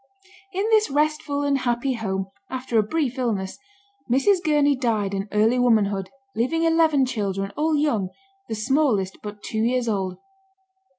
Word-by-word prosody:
In 390 +3 -1
this 435 -1 +4
restful 300 0 0
and 280 -1 +1
happy 245 +1 0
home, 195 -4 -3 0.2
after 255 -3 0
a - - +6
brief 260 +3 -2
illness, 205 -6 -2 0.5
Mrs. 350 - +3
Gurney 295 -2 +3
died 220 -6 0
in 195 +1 -2
early 220 +4 +3
womanhood, 205 -5 +2 0.3
leaving 260 +9 0
eleven 325 -4 +4
children, 200 -5 -2
all 310 +1 +1
young, 240 -11 +1 0.4
the 220 - -2
smallest 215 -5 +1
but 205 -1 -8
two 220 - -2
years 245 +1 +1
old. 190 -4 -1
245 Hz, 145 wpm, -24 LUFS, 210-290 Hz, 0.5 s, a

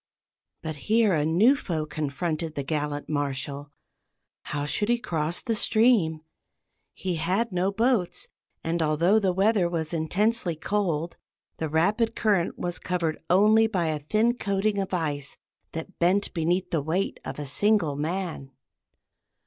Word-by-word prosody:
But 155 -2 -4
here 220 -2 +4
a 150 -3 +2
new 210 - +5
foe 165 - -3
confronted 155 +2 -3
the 140 - -2
gallant 145 0 -3
Marshal. 145 -1 -3 0.8
How 145 0 -3
should 205 +8 0
he 240 - +4
cross 165 -6 -2
the 230 - 0
stream? 215 -8 +3 0.7
He 180 -3 -2
had 190 +8 0
no 185 +2 +1
boats, 225 -3 0 0.4
and 165 +1 -1
although 165 +7 +3
the 195 -3 +1
weather 195 -1 +2
was 165 -1 -3
intensely 180 +3 +1
cold, 170 -2 -1 0.4
the 160 - -2
rapid 210 +9 +1
current 200 -6 +1
was 175 0 -3
covered 170 -3 -2
only 215 +5 +5
by 180 -7 0
a 155 -1 -1
thin 215 +11 +1
coating 200 +1 0
of 195 - -3
ice 150 -6 -2 0.4
that 165 +4 -7
bent 185 +4 +2
beneath 175 +2 0
the 160 - +1
weight 170 +7 -1
of 135 - -6
a 145 - -4
single 170 0 +1
man. 160 -2 -3
175 Hz, 145 wpm, -26 LUFS, 155-205 Hz, 0.8 s, new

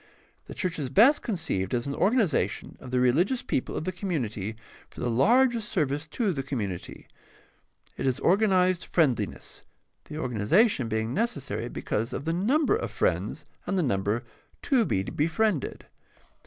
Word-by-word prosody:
The - - -8
church 180 -3 -2
is 135 -4 -2
best 235 - +5
conceived 140 - -2
as 120 - -1
an 140 - -3
organization 195 - +1
of 130 - -10
the 125 0 +1
religious 165 - +2
people 130 - -2
of - - -3
the 185 - -2
community 115 - -3 0.3
for - - -13
the 120 - -1
largest 235 - +3
service 145 -3 -1
to 205 +3 -1
the 135 - -2
community. 110 -10 -5 0.9
It 135 - -1
is 130 - 0
organized 185 -2 +3
friend 150 -8 +3
liness, - - -6 0.4
the 150 - -8
organization 130 - +2
being 110 +1 -1
necessary 215 - -2
because 115 +3 -3
of 140 - -4
the 165 - 0
number 275 - +2
of 455 - -3
friends - - -1 0.2
and 195 - 0
the 180 - +2
number 105 -1 0 0.4
to 255 -5 +3
be 95 - 0
befriended. 165 - -1
155 Hz, 155 wpm, -27 LUFS, 125-205 Hz, 0.9 s, best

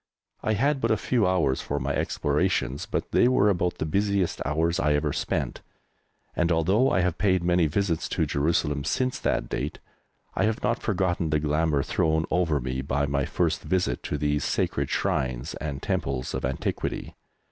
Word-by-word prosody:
I 110 - 0
had 135 +6 +1
but 115 - +1
a 110 - +3
few 110 -1 +1
hours 85 -8 +1
for 70 - -3
my 70 +2 -1
explorations, 70 +1 0
but - - -3
they - - +5
were 115 -5 +4
about 90 -2 0
the - - -2
busiest 100 +2 0
hours 80 +4 0
I 75 0 +2
ever 75 -1 0
spent, - - -2 0.7
and 85 0 +1
although 95 +10 +3
I 95 - +2
have 90 -2 -1
paid 95 -3 +2
many 85 -1 +3
visits 85 +1 -1
to - - 0
Jerusalem 75 -1 0
since 130 - -1
that - - 0
date - - -3 0.6
I - - +1
have 110 0 -1
not 120 - 0
forgotten 90 -5 0
the 75 0 +2
glamour 75 -1 +1
thrown 80 0 +1
over 85 -5 +2
me 65 +1 -3
by 70 +2 0
my 70 -1 0
first - - 0
visit 90 -9 0
to 75 - -2
these 75 -1 0
sacred - - 0
shrines 65 -2 -1
and 70 -3 -4
temples 65 -2 -2
of - - -2
antiquity. 65 +1 -3
80 Hz, 180 wpm, -26 LUFS, 70-95 Hz, 0.7 s, they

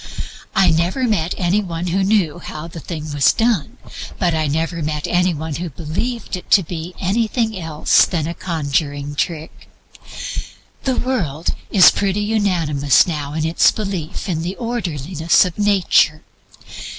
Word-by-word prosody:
I 190 -3 +5
never 170 +10 0
met 190 -8 0
any 185 +3 +1
one 170 -3 -4
who 185 +2 0
knew 190 -6 +1
how 155 -1 -7
the 170 0 -9
thing 155 -2 -6
was 145 -2 +4
done, 225 -9 0 0.4
but 175 -3 +1
I 155 -1 0
never 165 +3 -1
met 150 -1 -2
any 180 +1 +2
one 160 -1 -4
who 175 +1 -4
believed 175 - -4
it 180 - -10
to 195 - +6
be 170 +1 -6
anything 220 +3 0
else 160 -4 +3
than 160 -4 -2
a 170 - -3
conjuring 145 -4 -2
trick. 160 +1 -4 1.2
The 260 -1 +1
world 170 - -1 0.2
is 190 -3 +7
pretty 200 0 0
unanimous 175 - +2
now 150 -4 -4
in 155 0 -1
its 165 +1 +4
belief 195 -4 -4
in 165 -4 -1
the 180 +3 -3
orderliness 175 - +1
of 180 +2 -6
Nature. 195 -6 +3
170 Hz, 150 wpm, -19 LUFS, 155-195 Hz, 1.2 s, is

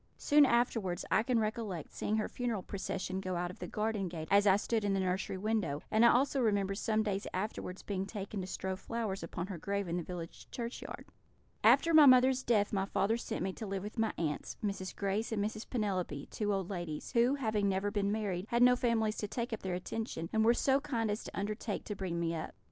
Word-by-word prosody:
Soon 290 -1 +5
afterwards 225 -7 +1
I - - +5
can 240 +1 +1
recollect 215 -6 -2
seeing 215 - -1
her 215 - 0
funeral 235 -6 -2
procession 190 -1 -3
go 185 -1 -3
out 175 0 -2
of - - -14
the - - -5
garden 215 -2 -1
gate 165 -2 -6
as 200 +1 +5
I 190 - +7
stood 220 +1 0
in 200 -1 +1
the - - +1
nursery 190 0 -1
window; 195 -8 -1
and 220 +2 +4
I 235 - +8
also 270 +2 +2
remember 200 -4 +2
some 215 +2 0
days 200 -2 -2
afterwards 185 -1 -4
being 195 -1 -3
taken 200 -1 -5
to 185 - -5
strew 190 0 -3
flowers 215 -1 -3
upon 170 +1 -4
her 190 -3 -6
grave 200 +2 -2
in 170 +1 -1
the - - -1
village 170 -1 -8
churchyard. 235 0 -6 0.6
"After 335 - +5
my 305 -2 +9
mother's 255 0 +6
death 215 -5 +2
my 195 -1 +1
father 200 +2 +1
sent 235 - -3
me 190 0 -2
to 220 - -6
live 195 -1 -3
with 210 +2 -6
my 220 - +2
aunts, 150 -3 -3
Mrs. 190 -2 -3
Grace 200 +3 -1
and 205 -2 0
Mrs. 215 +1 -5
Penelope, 185 - -2
two 210 -1 -1
old 195 -1 -1
ladies, 175 -5 -5
who, 245 +2 +3
having 215 -7 0
never 195 +1 0
been 200 -1 0
married, 205 -3 -2
had 235 +1 +4
no 250 0 +7
families 225 -3 +1
to 210 - -2
take 235 +2 -3
up 225 - -4
their 185 -2 -2
attention, 180 -3 -4
and 220 0 +3
were 235 +2 +5
so 270 +2 +3
kind 235 -7 -1
as 210 - -3
to - - -8
undertake 210 +1 -3
to 210 - -5
bring 185 -3 -3
me 165 -1 0
up. 165 - -5
205 Hz, 225 wpm, -33 LUFS, 190-225 Hz, 0.6 s, my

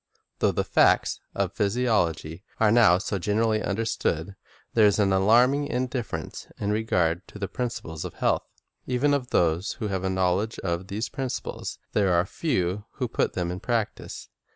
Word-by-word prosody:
Though - - +3
the - - 0
facts - - +3 0.2
of 100 -1 -1
physiology 100 -7 0 0.2
are 110 -2 +4
now 110 -7 +6
so 100 0 -3
gen 105 +4 -1
erally 110 -1 +2
understood, 100 -4 -1 0.4
there 110 -2 +6
is 100 - +2
an 100 -2 +3
alarming 120 +9 +4
indifference 125 -2 -3
in 100 - -1
regard 90 -5 0
to - - -11
the 100 -1 -3
principles 95 -11 -4
of - - -7
health. - - 0 0.4
Even 130 +3 +2
of 130 -3 -1
those 85 +3 +1
who 110 -4 -4
have 95 -1 -2
a 95 - 0
knowledge 95 +4 0
of 85 0 -2
these 105 +5 -3
principles, 135 -2 -4 0.2
there 100 -4 +3
are 85 +1 +3
few 100 - -1
who 125 - -2
put 120 - 0
them 90 -1 -2
in 90 - -5
practise. 115 -2 -3
105 Hz, 170 wpm, -26 LUFS, 90-115 Hz, 0.4 s, now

